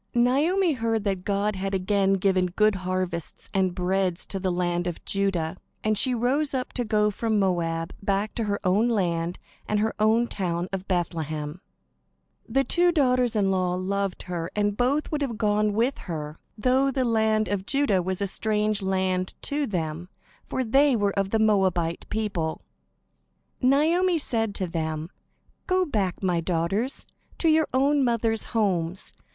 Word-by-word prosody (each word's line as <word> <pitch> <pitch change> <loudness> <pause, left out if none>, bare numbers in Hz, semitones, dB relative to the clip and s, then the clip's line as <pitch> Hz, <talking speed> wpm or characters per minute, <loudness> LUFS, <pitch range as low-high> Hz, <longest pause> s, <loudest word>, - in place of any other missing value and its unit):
Naomi 305 +9 +3
heard 225 -4 -1
that 195 -3 -1
God 205 +1 0
had 195 +1 -2
again 195 +1 +2
given 190 -1 +2
good 215 +4 +2
harvests 185 -3 -4
and 190 -2 +1
bread 185 0 +1
to 195 - -4
the 185 -1 0
land 175 0 -1
of 175 - -5
Judah, 190 -4 0 0.3
and 215 0 +2
she 250 +4 +3
rose 270 +5 +1
up 255 -1 -3
to 245 - -1
go 210 -1 +2
from 220 +1 -1
Moab 170 -4 0
back 200 +1 -1
to 230 - -2
her 200 -1 -1
own 205 +5 +3
land 175 -5 0 0.3
and 210 - +1
her 220 +1 0
own 220 +2 +4
town 180 -5 -2
of 190 0 -4
Bethlehem. 160 -3 -2 0.9
The 270 +4 +2
two 350 +4 +3
daughters 250 -6 +2
in 195 -2 +2
law 185 -1 +1
loved 195 +1 -2
her, 170 -2 -4
and 205 -1 +1
both 260 +6 0
would 300 -1 -1
have 245 -6 -2
gone 210 -1 +2
with 235 +6 +1
her, 155 -1 -5 0.2
though 260 +5 +2
the 265 -1 0
land 220 -2 +2
of 195 0 -2
Judah 275 -10 +2
was 185 +2 -1
a - - +1
strange 210 +1 0
land 185 -1 -1
to 285 0 -1
them, 170 -2 -3 0.4
for 260 - -1
they 270 +3 +4
were 205 -2 +1
of 195 -1 0
the 225 - +1
Moabite 190 -6 +1
people. 200 -7 -2 1.0
Naomi 325 +7 +3
said 225 -8 -1
to 190 - -2
them: 160 -1 -3 0.6
"Go 370 0 +2
back, 200 - -2
my 175 -3 +1
daughters, 185 - -1 0.3
to 330 - +2
your 315 -1 +4
own 275 +2 +3
mothers' 230 -2 0
homes. 185 -5 -1
200 Hz, 165 wpm, -25 LUFS, 180-235 Hz, 1.0 s, own